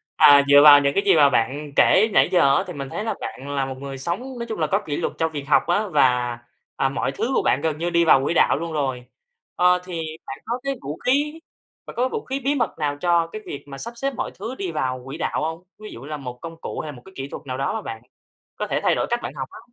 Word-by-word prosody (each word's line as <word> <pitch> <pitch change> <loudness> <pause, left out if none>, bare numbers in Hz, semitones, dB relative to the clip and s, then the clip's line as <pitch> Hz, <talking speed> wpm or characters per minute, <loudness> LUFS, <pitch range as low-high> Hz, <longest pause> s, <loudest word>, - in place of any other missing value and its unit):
à, 145 -1 +7
dựa 145 0 +8
vào 145 -1 +10
những 140 0 +1
cái 200 - +2
gì 195 - +5
mà 145 -3 +6
bạn 140 +4 -1
kể 215 +3 +5
nãy - - +4
giờ 140 -7 +4
á, - - +1
thì 180 - -6
mình 140 -3 -6
thấy 210 - -4
là 220 - -1
bạn 135 - -7
là 135 -1 0
một 135 -1 -6
người 135 0 -7
sống 170 +8 -2 0.2
nói 235 - -3
chung 220 - -4
là 155 - +1
có 195 +7 +1
kỷ 145 -2 -3
luật - - -2
cho 160 0 0
việc 145 -3 -5
học 150 - +4
á 205 +5 +1
và, 125 -8 +2 0.4
à, 135 - +1
mọi 135 -1 -2
thứ 230 - -2
của - - +3
bạn 130 - +1
gần 155 -1 -1
như 170 +2 -2
đi 170 0 +2
vào 135 -4 +5
quỹ 145 - 0
đạo 160 - +3
luôn 165 +1 -5
rồi. 130 -5 -2 0.5
Ờ, 180 0 +4
thì 175 -3 -4 0.2
bạn 135 - -7
có 240 +2 -2
cái 275 0 -2
vũ 145 +3 -6
khí, 295 +5 +1 0.5
bạn - - -10
có 255 +2 +1
vũ - - -5
khí 270 +1 -3
bí 275 +2 0
mật 240 -7 -1
nào 145 -1 -1
cho 170 -2 +2
cái 215 +6 -8
việc 140 - -7
mà 135 -1 -8
sắp 235 +11 -6
xếp 275 +3 -2
mọi 250 - -3
thứ 225 +6 -5
đi 195 -7 -4
vào 130 -4 -2
quỹ 135 +3 -7
đạo - - -2
hông? 160 +2 -4 0.2
Ví 215 0 -9
dụ 115 - -10
như 135 - -10
là 150 0 -4
một 125 -3 -8
công 165 0 -8
cụ - - -5
hay 155 - -5
là - - -12
một 120 - -13
cái 190 - -14
kỹ 135 0 -5
thuật 155 - -9
nào 130 -1 -4
đó 135 - -1
mà 220 - -3
bạn 115 - -7 0.5
có - - -4
thể - - -1
thay - - +3
đổi - - -1
cách 240 - 0
bạn - - -5
học 130 -2 -4
á? - - -11
155 Hz, 295 wpm, -22 LUFS, 135-195 Hz, 0.5 s, vào